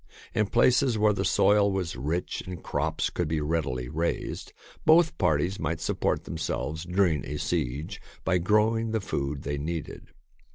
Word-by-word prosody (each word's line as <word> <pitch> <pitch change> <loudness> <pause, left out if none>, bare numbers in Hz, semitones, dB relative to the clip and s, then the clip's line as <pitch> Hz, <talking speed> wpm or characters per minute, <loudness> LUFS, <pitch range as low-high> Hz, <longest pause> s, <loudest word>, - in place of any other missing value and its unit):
In 110 -1 +1
places 125 +2 +3
where 105 0 +4
the 95 - -1
soil 100 +1 +4
was 95 -4 -2
rich 80 +6 -2
and 90 -2 -7
crops 75 +2 -1
could 90 - -1
be 80 0 0
readily 75 -5 -1
raised, 80 +5 -3 0.3
both 160 +1 +5
parties 90 +2 +1
might 80 +1 -2
support - - -1
themselves 80 +3 -3
during 90 -5 +1
a 75 - -4
siege 75 - -2 0.2
by 90 -1 +2
grow 105 +5 +3
ing 115 0 -2
the 110 - +2
food 70 -7 -3
they 70 0 -2
needed. 80 +1 -5
85 Hz, 160 wpm, -27 LUFS, 75-105 Hz, 0.3 s, both